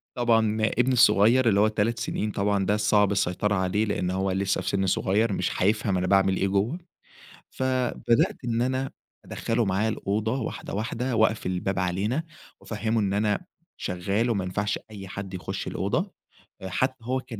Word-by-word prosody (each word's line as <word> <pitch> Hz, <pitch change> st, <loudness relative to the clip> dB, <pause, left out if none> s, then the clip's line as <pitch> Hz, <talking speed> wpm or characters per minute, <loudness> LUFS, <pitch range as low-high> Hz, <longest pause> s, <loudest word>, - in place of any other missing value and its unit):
طبعًا 115 Hz, -3 st, +2 dB
ابني 125 Hz, +4 st, +2 dB
الصغير 115 Hz, +2 st, +5 dB
اللي 100 Hz, -, +3 dB
هو 105 Hz, -, +5 dB
3 110 Hz, +2 st, 0 dB
سنين 105 Hz, 0 st, -2 dB
طبعًا 100 Hz, -1 st, 0 dB
ده 105 Hz, -, +2 dB
الصعب 105 Hz, -1 st, +3 dB
السيطرة 100 Hz, +1 st, 0 dB
عليه 95 Hz, +3 st, +1 dB
لإن 90 Hz, -3 st, -1 dB
هو 95 Hz, 0 st, 0 dB
لسّه 95 Hz, +1 st, 0 dB
في -, -, -2 dB
سِن 95 Hz, -1 st, 0 dB
صغير 100 Hz, +4 st, +1 dB
مش -, -, -2 dB
هيفهم 105 Hz, -1 st, +2 dB
أنا 90 Hz, 0 st, -1 dB
باعمل 95 Hz, 0 st, +3 dB
إيه 95 Hz, -, +1 dB
جوّه. 100 Hz, -, 0 dB, 0.7 s
فبدأت 130 Hz, -2 st, 0 dB
إن 115 Hz, -1 st, 0 dB
أنا 130 Hz, +1 st, -1 dB, 0.3 s
أدخّله 115 Hz, 0 st, -1 dB
معايا 100 Hz, +3 st, +1 dB
الأوضة 110 Hz, +4 st, -1 dB
واحدة، 110 Hz, -, -5 dB
واحدة 120 Hz, +4 st, -2 dB
وأقفل 110 Hz, -3 st, +2 dB
الباب 90 Hz, +1 st, -2 dB
علينا، 100 Hz, -, -1 dB, 0.4 s
وأفهِّمه 110 Hz, +1 st, -2 dB
إن 100 Hz, -2 st, 0 dB
أنا 105 Hz, -, 0 dB, 0.3 s
شغّال 100 Hz, +6 st, -1 dB
وما 100 Hz, -5 st, 0 dB
ينفعش 100 Hz, +3 st, -2 dB
أي 100 Hz, -2 st, -8 dB
حد 95 Hz, 0 st, -7 dB
يخُش 90 Hz, -, -5 dB
الأوضة -, -, -1 dB, 0.5 s
أ 95 Hz, -, -5 dB
حتّى 130 Hz, +8 st, 0 dB
هو 130 Hz, +1 st, 0 dB
كان 115 Hz, -4 st, -9 dB
105 Hz, 170 wpm, -26 LUFS, 95-115 Hz, 0.7 s, الصغير